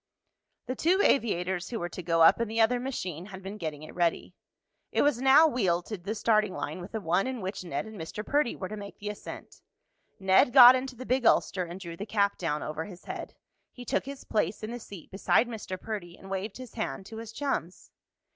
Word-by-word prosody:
The 255 Hz, -, -2 dB
two 355 Hz, +7 st, +2 dB
aviators 185 Hz, -7 st, +1 dB
who 235 Hz, -, -3 dB
were 175 Hz, -, -2 dB
to 180 Hz, -, -7 dB
go 165 Hz, -1 st, +3 dB
up 165 Hz, -, +6 dB
in 235 Hz, -, 0 dB
the 225 Hz, +2 st, -3 dB
other 235 Hz, +2 st, +4 dB
machine 185 Hz, -, -4 dB
had 190 Hz, -2 st, -10 dB
been 200 Hz, +2 st, -7 dB
getting 155 Hz, -3 st, -5 dB
it 155 Hz, -, -10 dB
ready. 170 Hz, -2 st, 0 dB, 0.6 s
It -, -, +2 dB
was 285 Hz, -4 st, +2 dB
now 270 Hz, +4 st, +7 dB
wheeled 190 Hz, -, +1 dB
to 215 Hz, -, -5 dB
the 200 Hz, +5 st, -4 dB
starting 215 Hz, -3 st, +2 dB
line 185 Hz, -, -4 dB
with 180 Hz, +5 st, -10 dB
the 220 Hz, -, -1 dB
one 180 Hz, +3 st, +1 dB
in 260 Hz, -2 st, -3 dB
which 190 Hz, -1 st, -4 dB
Ned 170 Hz, 0 st, -3 dB
and 220 Hz, -5 st, -9 dB
Mr. 210 Hz, +7 st, -6 dB
Perdy 290 Hz, -4 st, +1 dB
were 185 Hz, -, -5 dB
to 215 Hz, -, -6 dB
make 200 Hz, -1 st, -9 dB
the 205 Hz, -, -5 dB
ascent. 210 Hz, -, -9 dB, 0.6 s
Ned 190 Hz, +5 st, +4 dB
got 250 Hz, -1 st, +11 dB
into 260 Hz, 0 st, -3 dB
the 255 Hz, +2 st, -8 dB
big 255 Hz, +1 st, +1 dB
ulster 185 Hz, -5 st, +3 dB
and 175 Hz, +2 st, -8 dB
drew 170 Hz, -3 st, -7 dB
the 205 Hz, +5 st, -6 dB
cap 200 Hz, -1 st, +1 dB
down 150 Hz, -4 st, -1 dB
over 155 Hz, +1 st, -4 dB
his 180 Hz, -3 st, -12 dB
head. -, -, -6 dB, 0.4 s
He 245 Hz, -, -11 dB
took -, -, 0 dB
his 280 Hz, -1 st, -7 dB
place 210 Hz, 0 st, -1 dB
in 215 Hz, -, -4 dB
the 240 Hz, -, -5 dB
seat 195 Hz, -7 st, -11 dB
beside 200 Hz, +4 st, +2 dB
Mr. 210 Hz, -5 st, -6 dB
Perdy 190 Hz, -5 st, -6 dB
and 195 Hz, -, -12 dB
waved 195 Hz, +2 st, -3 dB
his 255 Hz, -2 st, -10 dB
hand 135 Hz, +8 st, -4 dB
to 220 Hz, +2 st, -9 dB
his 225 Hz, -1 st, -7 dB
chums. 230 Hz, -, -3 dB
205 Hz, 230 wpm, -28 LUFS, 180-235 Hz, 0.6 s, got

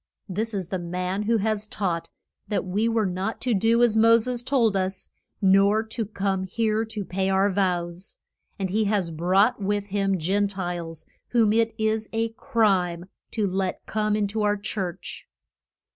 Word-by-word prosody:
This 215 Hz, +3 st, -2 dB
is 185 Hz, -3 st, -3 dB
the 190 Hz, -, -2 dB
man 180 Hz, +3 st, -2 dB
who 230 Hz, +2 st, +2 dB
has 215 Hz, 0 st, -1 dB
taught 180 Hz, -6 st, -2 dB, 0.4 s
that 205 Hz, -3 st, -1 dB
we 205 Hz, +5 st, 0 dB
were 225 Hz, -2 st, +1 dB
not 190 Hz, +4 st, -2 dB
to 245 Hz, -1 st, +1 dB
do 225 Hz, +4 st, +3 dB
as 230 Hz, -3 st, +4 dB
Mo 230 Hz, +1 st, +6 dB
ses 240 Hz, +1 st, -1 dB
told 240 Hz, -5 st, +2 dB
us, 190 Hz, 0 st, -2 dB, 0.3 s
nor 200 Hz, +3 st, +5 dB
to 220 Hz, -1 st, -4 dB
come 195 Hz, -2 st, -1 dB
here 215 Hz, +3 st, 0 dB
to 215 Hz, -3 st, -5 dB
pay 190 Hz, +1 st, -1 dB
our 195 Hz, +1 st, +3 dB
vows. 180 Hz, -1 st, -2 dB, 0.4 s
And 190 Hz, -3 st, -2 dB
he 215 Hz, +2 st, +1 dB
has 200 Hz, -5 st, 0 dB
brought 190 Hz, +8 st, +2 dB
with 205 Hz, +1 st, -1 dB
him 195 Hz, -1 st, +1 dB
Gen 195 Hz, +5 st, +1 dB
tiles 175 Hz, -4 st, -5 dB, 0.3 s
whom 225 Hz, -3 st, +4 dB
it 225 Hz, 0 st, +2 dB
is 220 Hz, -1 st, 0 dB
a 225 Hz, 0 st, 0 dB
crime 190 Hz, -6 st, 0 dB, 0.2 s
to 215 Hz, -3 st, 0 dB
let 190 Hz, -1 st, -2 dB
come 215 Hz, -1 st, 0 dB
in 210 Hz, -1 st, +1 dB
to 215 Hz, +1 st, -2 dB
our 205 Hz, 0 st, +2 dB
church. 190 Hz, -3 st, -5 dB
200 Hz, 175 wpm, -25 LUFS, 185-220 Hz, 0.4 s, Mo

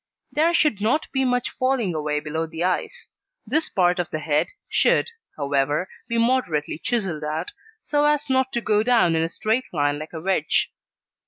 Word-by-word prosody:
There 315 Hz, +3 st, +3 dB
should 300 Hz, -, +2 dB
not 240 Hz, +9 st, +1 dB
be 265 Hz, -1 st, +1 dB
much 250 Hz, -1 st, 0 dB
falling 255 Hz, -8 st, 0 dB
away 150 Hz, -1 st, -1 dB
below 160 Hz, +2 st, -3 dB
the 165 Hz, +1 st, -4 dB
eyes. 185 Hz, -, -2 dB, 0.4 s
This 315 Hz, +1 st, +1 dB
part 180 Hz, -1 st, +2 dB
of 175 Hz, -, -1 dB
the -, -, -3 dB
head, 150 Hz, -1 st, +1 dB, 0.2 s
should, -, -, +2 dB, 0.3 s
however, 145 Hz, +4 st, 0 dB, 0.2 s
be 235 Hz, -, -1 dB
moderately 230 Hz, -, +1 dB
chiselled 190 Hz, -11 st, -1 dB
out, 155 Hz, +3 st, -3 dB, 0.3 s
so 295 Hz, 0 st, +1 dB
as 295 Hz, 0 st, +2 dB
not 260 Hz, 0 st, +1 dB
to 235 Hz, -, 0 dB
go 210 Hz, -2 st, +2 dB
down 225 Hz, -8 st, +3 dB
in 160 Hz, -, +2 dB
a 165 Hz, -, 0 dB
straight 220 Hz, +8 st, -1 dB
line 145 Hz, -2 st, 0 dB
like 155 Hz, +2 st, -8 dB
a 160 Hz, -, -5 dB
wedge. 170 Hz, -3 st, +1 dB
190 Hz, 180 wpm, -23 LUFS, 155-255 Hz, 0.4 s, There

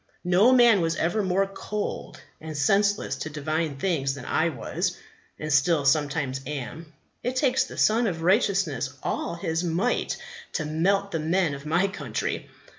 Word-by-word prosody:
No 185 Hz, +7 st, +5 dB
man 240 Hz, -6 st, +6 dB
was 165 Hz, 0 st, 0 dB
ever 175 Hz, +6 st, 0 dB
more 190 Hz, 0 st, +1 dB
cold 205 Hz, +1 st, -5 dB, 0.2 s
and 155 Hz, -1 st, -7 dB
senseless 200 Hz, +7 st, +2 dB
to 155 Hz, -, -5 dB
divine 155 Hz, 0 st, -2 dB
things 140 Hz, -5 st, 0 dB
than 135 Hz, -, -9 dB
I 170 Hz, -, +1 dB
was, 130 Hz, -8 st, -3 dB, 0.4 s
and 155 Hz, -1 st, -2 dB
still 150 Hz, 0 st, +3 dB
sometimes 140 Hz, -2 st, +1 dB
am. 150 Hz, +3 st, -6 dB, 0.3 s
It 250 Hz, +2 st, -2 dB
takes 260 Hz, -1 st, +2 dB
the -, -, -10 dB
Sun 225 Hz, +2 st, +3 dB
of 165 Hz, -4 st, -3 dB
Righteousness 175 Hz, -, +1 dB
all -, -, -2 dB
His 165 Hz, 0 st, -2 dB
might 180 Hz, +8 st, 0 dB, 0.4 s
to 155 Hz, -, -1 dB
melt 195 Hz, +6 st, +1 dB
the 165 Hz, -, -1 dB
men 165 Hz, 0 st, +1 dB
of 140 Hz, +2 st, -8 dB
my 175 Hz, +5 st, +2 dB
country. 195 Hz, -, -4 dB
165 Hz, 160 wpm, -26 LUFS, 150-195 Hz, 0.4 s, man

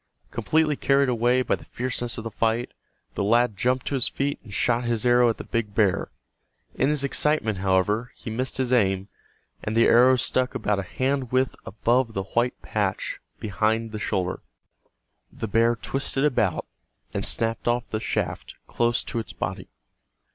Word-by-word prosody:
Completely 150 Hz, +6 st, +1 dB
carried 140 Hz, -1 st, +2 dB
away 125 Hz, +1 st, +2 dB
by -, -, 0 dB
the -, -, -3 dB
fierceness 120 Hz, -1 st, -3 dB
of 115 Hz, -, -5 dB
the 115 Hz, -, -5 dB
fight, 115 Hz, +3 st, 0 dB, 0.4 s
the -, -, -1 dB
lad 115 Hz, +1 st, +3 dB
jumped 125 Hz, +5 st, 0 dB
to -, -, -2 dB
his 130 Hz, -3 st, +2 dB
feet 140 Hz, +1 st, -2 dB
and 110 Hz, -, -13 dB
shot 120 Hz, +3 st, +1 dB
his 120 Hz, -1 st, -1 dB
arrow 120 Hz, 0 st, +5 dB
at 115 Hz, -, -1 dB
the -, -, -6 dB
big 110 Hz, -3 st, -3 dB
bear. 100 Hz, -5 st, +2 dB, 0.6 s
In 135 Hz, -, +1 dB
his 150 Hz, -2 st, +1 dB
excitement, 140 Hz, -7 st, +1 dB
however, 100 Hz, +5 st, +1 dB
he 115 Hz, -, -7 dB
missed 130 Hz, +4 st, -2 dB
his 130 Hz, -1 st, 0 dB
aim, 95 Hz, -4 st, +2 dB, 0.5 s
and 110 Hz, +2 st, -2 dB
the 115 Hz, -, +6 dB
arrow 125 Hz, +2 st, +6 dB
struck 125 Hz, +1 st, 0 dB
about 105 Hz, -1 st, 0 dB
a -, -, 0 dB
hand 130 Hz, +6 st, -1 dB
width 130 Hz, 0 st, +1 dB
above 115 Hz, +3 st, +1 dB
the 95 Hz, -, -1 dB
white 120 Hz, +6 st, -1 dB
patch -, -, -2 dB, 0.2 s
behind 110 Hz, +3 st, 0 dB
the 110 Hz, -, -5 dB
shoulder. 95 Hz, -3 st, -1 dB, 0.9 s
The 115 Hz, -, -5 dB
bear 115 Hz, +3 st, +3 dB
twisted 135 Hz, +4 st, -1 dB
about 110 Hz, -, +1 dB, 0.5 s
and -, -, -2 dB
snapped 115 Hz, 0 st, -1 dB
off 120 Hz, 0 st, +1 dB
the 110 Hz, -, -2 dB
shaft -, -, -3 dB
close 120 Hz, 0 st, 0 dB
to 120 Hz, -, -3 dB
its 100 Hz, -6 st, -6 dB
body. -, -, -4 dB
120 Hz, 175 wpm, -25 LUFS, 110-130 Hz, 0.9 s, the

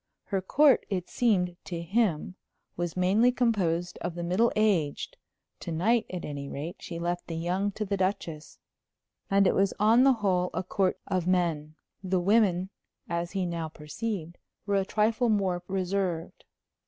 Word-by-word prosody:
Her 195 Hz, -2 st, -2 dB
court, 280 Hz, +8 st, +4 dB
it 185 Hz, -4 st, -3 dB
seemed 180 Hz, -7 st, +1 dB
to 170 Hz, -2 st, -4 dB
him, 190 Hz, -3 st, 0 dB, 0.4 s
was 175 Hz, 0 st, -3 dB
mainly 200 Hz, +7 st, +4 dB
composed 185 Hz, -9 st, 0 dB
of 175 Hz, -1 st, -4 dB
the 175 Hz, -, -4 dB
middle 185 Hz, +7 st, +2 dB
aged; 190 Hz, -9 st, +1 dB, 0.4 s
to -, -, -6 dB
night, 215 Hz, +9 st, +2 dB
at 180 Hz, -2 st, -5 dB
any 140 Hz, -1 st, -5 dB
rate, 155 Hz, +5 st, -5 dB
she 170 Hz, -, -7 dB
left 175 Hz, +1 st, -3 dB
the 165 Hz, -, -4 dB
young 180 Hz, +5 st, -1 dB
to 215 Hz, -, -3 dB
the 200 Hz, 0 st, -1 dB
Duchess. 180 Hz, -5 st, -3 dB, 0.7 s
And 195 Hz, 0 st, +4 dB
it -, -, +4 dB
was 195 Hz, 0 st, +1 dB
on 225 Hz, +4 st, +5 dB
the 270 Hz, 0 st, +6 dB
whole 185 Hz, -5 st, +1 dB
a 185 Hz, -, -1 dB
court 185 Hz, 0 st, 0 dB
of 185 Hz, -3 st, -1 dB
men. 165 Hz, -4 st, 0 dB, 0.3 s
The 185 Hz, -1 st, +1 dB
women, 190 Hz, -1 st, +2 dB, 0.4 s
as 170 Hz, +1 st, -3 dB
he 190 Hz, -2 st, 0 dB
now 170 Hz, -2 st, -3 dB
perceived, 170 Hz, +3 st, -5 dB, 0.3 s
were 200 Hz, -, -1 dB
a 195 Hz, -, +1 dB
trifle 220 Hz, +3 st, +1 dB
more 190 Hz, -4 st, +1 dB
reserved. 185 Hz, -3 st, -2 dB
185 Hz, 165 wpm, -28 LUFS, 170-205 Hz, 0.7 s, the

